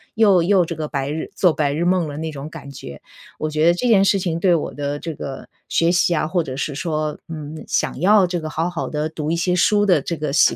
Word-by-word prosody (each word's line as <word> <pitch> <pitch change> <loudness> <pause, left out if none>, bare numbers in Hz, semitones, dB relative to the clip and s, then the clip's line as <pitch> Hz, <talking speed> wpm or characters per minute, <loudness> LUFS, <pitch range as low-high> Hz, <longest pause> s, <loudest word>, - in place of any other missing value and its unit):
又 205 -5 +5
又 185 +1 +3
这 170 - -5
个 155 -1 -4
白 140 -1 -3
日 155 +1 -4
做 180 -4 +3
白 145 -2 0
日 160 +4 -1
梦 180 -2 +2
了， 145 -1 -6
那 160 +1 -4
种 145 0 -7
感 150 -4 -10
觉。 70 - -9 0.4
我 155 - -3
觉 155 +2 +2
得 170 - +6
这 245 - -1
件 210 -5 +5
事 195 0 +3
情， 175 -3 -2
对 180 -1 +4
我 160 - -3
的 145 0 -3
这 165 +2 -5
个 135 -2 -7 0.2
学 165 +1 +2
习 180 -1 +2
啊， 155 - 0
或 175 +2 +1
者 130 -3 -6
是 145 +1 -2
说， 155 0 -2
嗯， 155 -1 -7
想 - - -1
要 200 +2 +5
这 175 0 -2
个 155 - -5
好 160 +2 -1
好 175 -2 -4
地 150 0 -2
读 155 -1 -4
一 165 - +1
些 180 +1 +1
书 205 +3 +3
的 180 -7 +4
这 170 +4 -4
个 150 -2 -3
习 145 - +4
160 Hz, 285 characters per minute, -21 LUFS, 150-180 Hz, 0.4 s, 得